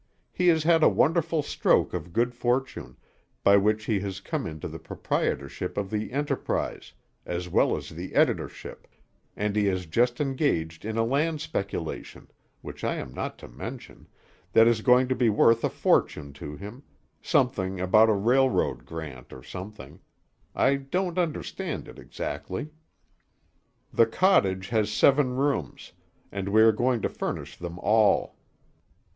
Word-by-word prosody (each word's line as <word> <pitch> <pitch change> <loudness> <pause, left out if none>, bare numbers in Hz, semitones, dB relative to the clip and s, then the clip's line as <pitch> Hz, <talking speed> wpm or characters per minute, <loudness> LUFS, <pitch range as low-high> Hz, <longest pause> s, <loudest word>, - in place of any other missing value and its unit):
He 180 - 0
has 160 -3 +4
had 165 0 +4
a - - +7
wonderful 165 0 +1
stroke - - +1
of 90 - -5
good 120 +6 +1
fortune, 125 - -2 0.5
by 100 0 +6
which 105 +2 +1
he 105 -3 +1
has 95 -1 -5
come 145 +6 -3
into 80 -1 -6
the - - -8
proprietorship 70 -1 -3
of 100 -2 -2
the 105 +1 -3
Enterprise, 140 +1 -2 0.3
as 90 0 -4
well - - +2
as - - -8
the - - -8
editorship, - - -1 0.5
and 105 0 -2
he 105 -1 +2
has 95 -2 0
just 120 +9 +1
engaged 130 - -1
in 110 +1 -3
a 115 - +3
land 150 +6 0
speculation 100 - -5 0.3
which - - -9
I - - 0
am 65 - -6
not - - -5
to - - -11
mention - - -9 0.5
that 115 0 +7
is 115 -2 +2
going 125 +2 +4
to 130 - +1
be 125 -2 +2
worth 115 +2 +4
a - - +2
fortune 70 -2 0
to 75 +1 -8
him, 105 - -9 0.4
something 100 - 0
about 110 +5 +5
a - - +4
railroad 120 - +1
grant, 75 -6 -8
or 65 - -11
something. 90 -7 -9 0.6
I 135 +1 +3
don't 175 +6 -2
understand 170 -4 -3
it - - -12
exactly. 120 +12 -5 1.2
The 115 - +5
cottage 95 - +2
has 110 -2 +1
seven 135 +3 +3
rooms, 135 - -2 0.4
and 100 -1 -4
we 110 +2 +5
are 115 - +7
going 120 +1 0
to - - +3
furnish - - -5
them 85 0 -7
all. 105 +2 +2
110 Hz, 155 wpm, -26 LUFS, 95-135 Hz, 1.2 s, a